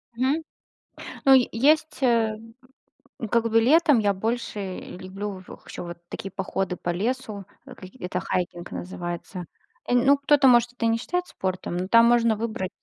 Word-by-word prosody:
Мгм, 265 +7 0 0.8
ну 270 - +8 0.2
есть, 295 +4 +2
э, 230 -4 +2 1.0
как 230 -1 +2
бы 225 +1 +5
летом, 295 +3 +5
я 205 -2 +2
больше 205 -2 -3
люблю 190 +1 -7
в - - -13
ещё - - -7
вот 170 0 -8
такие 195 - -6
походы 190 -1 -3
по - - -7
лесу, 215 +2 -3 0.2
в 255 -2 -11 0.2
это 180 0 -3
хайкинг 175 -1 -3
называется. 175 0 -6 0.4
Э, - - -2
н 245 0 +3
ну 280 +1 +6
кто-то 280 -1 +4
может 240 -1 +4
это 240 -2 -2
не 225 0 +2
считает 355 +9 -2
спортом, 185 - -4
но 180 +1 -3
там 230 +2 +6
можно 235 -1 +4
выбрать. 220 -4 -3
225 Hz, 160 wpm, -25 LUFS, 185-250 Hz, 1.0 s, ну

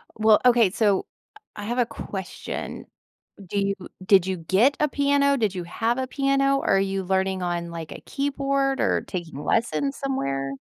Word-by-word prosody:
Well, 220 -1 +5
okay, 235 -5 +5
so 205 -1 +1 0.5
I 205 - -7
have 240 +3 -2
a 245 - +3
question. 195 -4 -6 0.6
Do 200 - -4
you 200 0 +1 0.3
did 190 -2 +5
you 190 -1 -1
get 195 - +3
a 300 - +3
piano? 280 0 +2
Did 210 -5 0
you 180 - -3
have 230 +8 -1
a 260 0 -2
piano? 275 0 +1
Are 195 - +4
you 195 0 -1
learning 190 0 0
on, 170 -1 -2
like, 165 -2 -7
a - - -8
keyboard 275 -1 0
or - - +2
taking 170 -6 -5
lessons 255 - 0
somewhere? 135 - -2
215 Hz, 170 wpm, -24 LUFS, 185-275 Hz, 0.6 s, Well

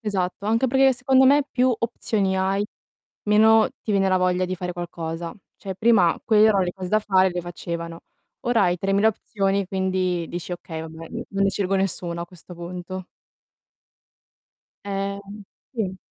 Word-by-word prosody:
esatto. 200 -2 -2
Anche 230 +4 +2
perché 265 +1 +4
secondo 260 +1 +3
me 285 +2 +6
più 250 0 +2
opzioni 215 -4 -1
hai, 195 +2 +1 0.6
meno 220 +1 +5
ti - - -4
viene 195 -1 +3
la 185 - +3
voglia 185 0 +1
di 185 0 -2
fare 180 0 -4
qualcosa. 170 -1 -5 0.2
Cioè 195 -2 -6
prima 200 -6 +4
quelle 215 -1 +5
erano 200 -3 +3
le 175 - -3
cose 185 -1 -6
da 215 - +3
fare 190 -2 +3
e - - -5
le 175 - -2
facevano. 170 -1 -6 0.4
Ora 240 -3 +2
hai 180 0 +1
3.000 195 +3 +3
opzioni 200 -2 -1
quindi 185 -2 -1
dici: 175 +1 -5
"Okay, 165 -2 -6
vabbè 160 0 -9
non 195 0 -3
ne 195 - +3
scelgo 195 -1 -1
nessuna 175 -3 -2
a - - -7
questo 180 0 -13
punto". 180 +2 -7 1.8
Ehm, 200 +1 -4 0.3
sì. 195 -7 -3
190 Hz, 165 wpm, -23 LUFS, 180-210 Hz, 1.8 s, me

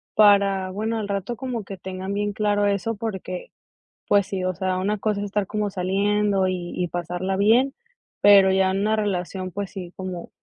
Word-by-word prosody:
para, 200 -2 +5
bueno, 220 +3 -2
al 210 - -3
rato 200 +4 -2
como 245 -3 -4
que 195 - -7
tengan 190 +1 -5
bien 205 0 -1
claro 205 0 +1
eso, 200 +3 -1
porque, 190 -4 -5 0.6
pues 200 -2 +3
sí, 190 -2 -3
o 185 - 0
sea, 185 0 -1
una 205 +3 0
cosa 210 -1 -1
es 205 - -3
estar 205 -1 -1
como 210 0 -1
saliendo, 195 +1 +1
y 180 -2 -4
y 180 - -1
pasarla 180 +3 -3
bien, 235 +7 +4 0.5
pero, 200 -2 +7
ya 190 0 +3
en 195 +1 -1
una 215 +1 +2
relación, 185 -2 -2
pues 200 +1 -5
sí, 180 -3 -8
como 185 -2 -6
195 Hz, 190 wpm, -24 LUFS, 185-205 Hz, 0.6 s, pero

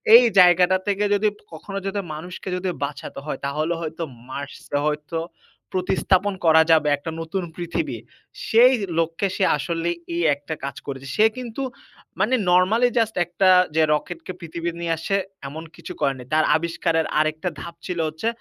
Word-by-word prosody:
এই 245 - +10 0.2
জায়গাটা 180 +1 +6
থেকে 205 0 +1
যদি 205 +1 +2 0.3
কখনো 195 +5 -7
যদি 200 +1 -1
মানুষকে 180 +4 -7
যদি 180 +1 -2
বাঁচাতে 140 -1 -5
হয় 155 - -4
তাহলে 155 +4 -1
হয়তো 160 +1 -4 0.2
Mars 140 +2 -6 0.2
এ - - +4
হয়তো 150 +2 -2 0.6
প্রতিস্থাপন 190 +2 +1
করা 160 0 +7
যাবে 155 -2 +5
একটা 160 +3 -6
নতুন 180 +3 -3
পৃথিবীর। 165 -9 -3 0.5
সেই 245 +4 +6 0.3
লক্ষ্যে 165 +4 0
সে - - 0
আসলেই 170 +3 -2 0.2
এই 170 - 0
একটা 145 +3 -7
কাজ 140 - -4
করেছে। 135 -1 -6
সে 215 - +5
কিন্তু 250 0 -5 0.6
মানে 230 +7 +3 0.2
normally 210 +7 +4
just 220 -1 0
একটা 180 +2 +2 0.3
যে, 160 - +5
রকেটকে 165 +4 -4
পৃথিবীতে 170 0 -5
নিয়ে 170 -1 0
আসছে 195 +5 -1 0.3
এমন 155 +4 -7
কিছু - - -8
করেনি। 135 -2 0
তার 155 - +4
আবিষ্কারের 165 0 0
আরেকটা 155 +3 0
ধাপ 170 - -8
ছিল 180 -2 -3
হচ্ছে 160 +8 -4
170 Hz, 160 wpm, -23 LUFS, 155-190 Hz, 0.6 s, এই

